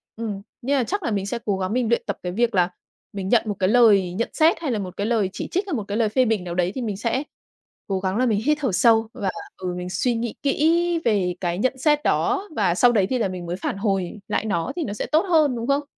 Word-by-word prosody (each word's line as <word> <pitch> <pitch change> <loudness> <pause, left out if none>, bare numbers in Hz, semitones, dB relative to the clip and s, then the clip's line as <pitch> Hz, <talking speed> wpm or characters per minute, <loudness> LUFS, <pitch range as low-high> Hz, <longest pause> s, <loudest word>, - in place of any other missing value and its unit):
ừm, 215 -3 -4 0.2
nên 275 +4 0
là 260 - +2
chắc 400 - -3
là 260 - -1
mình 200 -2 -1
sẽ 235 +4 -3
cố 200 -2 0
gắng 190 +2 -2
mình 245 -2 0
luyện 235 - +2
tập 200 - -3
cái 180 - -3
việc 235 +3 0
là 180 -1 +3 0.4
mình 195 -1 -4
nhận 230 0 +4
một 210 -2 -2
cái 185 - +2
lời 205 -6 +5
nhận 225 +6 -2
xét, 320 +1 +3
hay 300 -6 -1
là 220 - -1
một 185 -2 -6
cái 200 - -1
lời 220 -5 +1
chỉ - - -5
trích, 375 - 0
hay 375 - -3
một 225 -7 -1
cái 205 - -2
lời 225 -2 +2
phê 255 +4 +2
bình 220 -5 0
nào 175 -1 -5
đấy 180 0 +1
thì 260 - -3
mình 210 -5 -3
sẽ 235 +6 -1 0.6
cố 195 -1 -1
gắng 190 +1 -1
là 255 - +2
mình 215 -4 +2
hít 300 +1 +3
thở 265 -6 0
sâu 225 +4 +4
và, 195 - -2 0.3
ừ, 180 -1 -4
mình 180 0 -5
suy 235 +7 0
nghĩ 230 -1 -3
kỹ 335 +4 +2
về 195 -6 +1
cái 175 -1 -1
nhận 260 +6 0
xét 295 +2 +2
đó, 400 +4 +1
và 190 -5 +2
sau 245 +5 +5
đấy 205 -5 +2
thì 260 - +1
là 220 - +1
mình 180 -2 -6
mới 170 +1 -3
phản 195 - -3
hồi 195 -1 -1
lại - - -1
nó 170 -6 -1
thì 350 - -2
nó 205 - -4
sẽ 210 - -3
tốt 310 +1 +3
hơn, 305 -6 +4
đúng 230 0 -4
không? 280 +1 +2
220 Hz, 285 wpm, -23 LUFS, 190-255 Hz, 0.6 s, lời